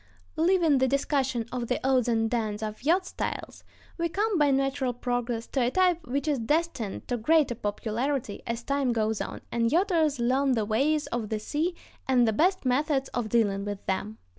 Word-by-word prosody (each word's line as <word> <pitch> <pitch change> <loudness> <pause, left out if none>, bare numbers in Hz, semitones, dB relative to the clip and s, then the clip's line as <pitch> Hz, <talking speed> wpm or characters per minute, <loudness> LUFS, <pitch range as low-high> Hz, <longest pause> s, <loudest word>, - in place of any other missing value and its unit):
Leaving 330 -4 +3
the 260 - +3
discussion 265 -3 0
of 245 -2 -3
the 250 - 0
odds 255 -3 +3
and 225 -1 +1
ends 220 -2 -1
of 215 0 -5
yacht 345 +7 +2
styles, - - -5 0.4
we 335 0 0
come, 415 +4 0
by 295 -1 +4
natural 270 -2 +1
progress, 245 -1 -2
to 270 - -1
a 240 - +3
type 355 -1 +1
which 280 +5 -2
is 290 -4 +1
destined 270 - -1
to 245 - -1
greater 290 +2 +3
popularity 225 +3 -2
as 230 0 -3
time 275 -2 0
goes 220 -1 0
on, - - -5
and 230 -1 +1
yachters 330 -4 +2
learn 260 +3 +2
the 220 -3 0
ways 285 +8 +1
of 230 -3 -2
the 220 - -1
sea 310 +11 -2 0.3
and 250 -3 +4
the 220 - +2
best 365 - +2
methods 270 +2 +1
of 240 -3 -3
dealing 205 -3 +1
with 205 -1 -5
them. 210 +3 -2
255 Hz, 190 wpm, -27 LUFS, 225-300 Hz, 0.4 s, by